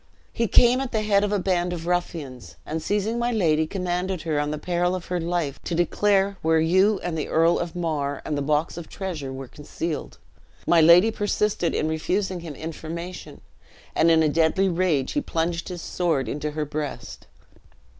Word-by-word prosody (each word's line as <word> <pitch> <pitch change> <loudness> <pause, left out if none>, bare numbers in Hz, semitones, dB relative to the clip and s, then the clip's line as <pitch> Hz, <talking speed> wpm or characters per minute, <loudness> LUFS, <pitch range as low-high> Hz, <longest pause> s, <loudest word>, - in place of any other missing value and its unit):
"He 230 - 0
came 245 +5 +5
at 270 - -4
the 220 -2 0
head 200 -1 +3
of 205 - 0
a 205 - +2
band 180 -2 0
of 165 -1 -6
ruffians, 145 - -3
and 160 +1 -3
seizing 210 +6 -1
my 240 +1 0
lady, 160 -8 +2
commanded 180 -1 -2
her 155 -3 0
on 145 0 -1
the 150 - -2
peril 175 +2 0
of 180 - -6
her 180 - +1
life, 165 -4 -2
to 170 - -2
declare 195 +3 +2
where 160 0 +3
you 190 +5 +3
and 175 -2 -2
the 155 - -2
Earl 165 +2 +3
of 170 -1 -4
Mar 150 -5 -2
and 150 - -2
the 145 - -1
box 150 +3 0
of 170 - -8
treasure 165 -9 -5
were 135 0 -7
concealed. 150 +3 -5 0.5
My 170 -1 +5
lady 175 +7 +7
persisted 205 -4 0
in 155 - 0
refusing 185 +4 -1
him 165 -4 -8
information, 165 +3 -7 0.5
and 165 - +4
in 160 -1 +5
a - - +3
deadly 165 +5 +2
rage 170 -7 +1
he 290 - 0
plunged 170 -4 -2
his 175 -2 -6
sword 160 -8 0
into 150 +5 -3
her 150 0 -3
breast." 150 -1 -6
170 Hz, 190 wpm, -24 LUFS, 155-190 Hz, 0.5 s, lady